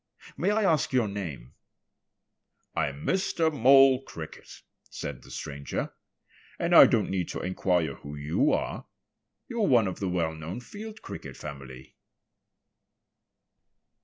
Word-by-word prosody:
May 185 - 0
I 215 +1 +2
ask 160 -7 +2
your 125 -4 +3
name?" 85 -12 -6 1.2
"I'm 70 +1 -2
Mr. 185 -4 +1
Mole 135 0 +6
Cricket," 80 - -10 0.3
said 70 -4 -6
the - - -16
stranger. 70 -2 -5 0.6
"And - - 0
I - - +10
don't - - +1
need 95 -2 -1
to - - -4
inquire 90 -4 0
who 70 +2 -9
you 75 +2 +1
are. - - -2 0.6
You're 230 -3 0
one 120 -5 +5
of 95 - -5
the 95 - -1
well 85 -3 0
known 80 +7 -6
Field 215 - -10
Cricket - - -8
family." 65 -3 -10
95 Hz, 130 wpm, -28 LUFS, -, 1.2 s, I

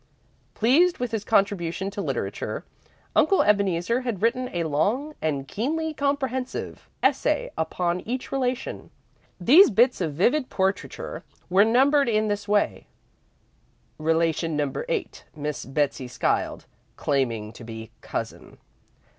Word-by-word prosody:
Pleased 315 +11 +4
with 245 -2 -3
his 220 -2 -2
contribution 195 -3 +1
to 205 0 -4
literature, - - -3 0.5
Uncle 390 - +4
Ebeneezer 200 +2 +2
had 240 -7 -3
written 255 +2 +1
a 175 -1 -1
long 205 - 0
and 140 -3 -1
keenly 315 - -2
comprehensive 270 -3 -2
essay 290 +2 +1
upon 175 +2 -1
each 250 +3 -4
relation. 255 -1 -2 0.5
These 295 - +7
bits 240 +1 +3
of 155 -5 -2
vivid 250 - +2
portraiture 190 +1 -2 0.3
were 190 +2 +6
numbered 270 +4 +4
in 215 -1 +1
this 205 0 -2
way: 205 0 +1 1.1
"Relation 165 0 +1
Number 145 -3 -2
8, - - -3
Miss 150 -1 -4
Betsey 135 -2 -1
Skiles, 125 - -1 0.3
Claiming 115 -6 -1
to 120 - -11
be 110 -1 -8
Cousin." - - -6
205 Hz, 120 wpm, -25 LUFS, 160-255 Hz, 1.1 s, These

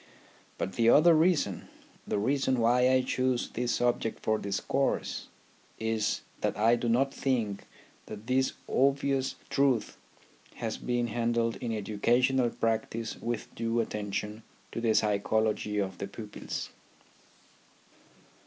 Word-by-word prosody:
But 95 - -3
the 115 -1 +4
other 165 +7 +7
reason, 155 - +2 0.4
the - - 0
reason 130 +3 +1
why 125 +2 +4
I 130 0 +4
choose 130 -1 0
this 120 0 -1
subject 120 -2 0
for 110 0 +1
discourse, 100 +7 -1 0.5
is 110 -1 -1 0.2
that - - -1
I 115 +3 +4
do 120 0 -2
not 135 +4 +2
think 115 -7 -1 0.4
that 110 0 -8
this 130 +2 +1
obvious 135 0 +1 0.2
truth 135 -5 +1 0.6
has - - -3
been 120 -1 0
handled 115 0 0
in 120 - -4
educational 120 +5 +2
practice 115 0 -2
with 120 0 -4
due 115 +1 -1
attention 105 0 -3 0.3
to 115 - -4
the 115 -2 +2
psychology 105 0 +1
of 95 -2 -2
the 100 - -3
pupils. 105 +1 -6
115 Hz, 125 wpm, -29 LUFS, 110-130 Hz, 0.6 s, other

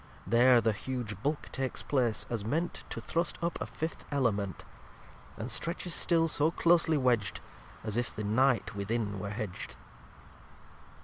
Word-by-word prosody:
There 120 +1 +6
the 110 0 +2
huge 110 -3 -5
Bulk 145 +4 -2
takes 135 -1 -3
place, 125 -6 +1
as 115 -4 -3
ment 160 +11 -2
To - - -4
thrust 170 +1 -1
up 170 0 -2
a - - -2
Fifth 160 +1 -5
Element; 105 -9 0 0.7
And 115 +4 -5
stretches 170 +7 -1
still 165 -1 +4
so 150 0 +3
closely 165 -2 +3
wedg'd 125 -6 +1 0.4
As 110 0 -1
if 120 - -1
the 105 - -3
Night 120 +2 +2
within 100 0 -2
were 100 +1 -4
hedg'd. 105 -3 -5
125 Hz, 145 wpm, -31 LUFS, 105-155 Hz, 0.7 s, There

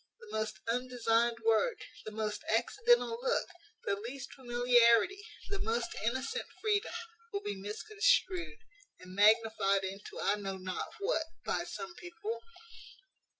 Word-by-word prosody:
The 470 -2 -9
most 215 0 -2
undesigned 235 -1 +1
word, 225 - +4 0.3
the 215 - -5
most 210 -1 -3
accidental 460 - +3
look, - - +1 0.4
the 200 - +1
least 250 +6 -7
familiarity, 245 - +4 0.2
the 400 0 -3
most 235 -6 -1
innocent 260 - -1
freedom, 425 0 0 0.4
will 400 -1 -2
be 205 - -2
misconstrued, 210 - +1 0.4
and 180 0 -11
magnified 210 -1 +4
into 195 +2 -6
I 205 - +2
know 195 -2 -4
not 185 0 -4
what, 405 -6 0 0.2
by - - 0
some 340 0 -6
people. 360 +6 -5
235 Hz, 125 wpm, -33 LUFS, -, 0.4 s, word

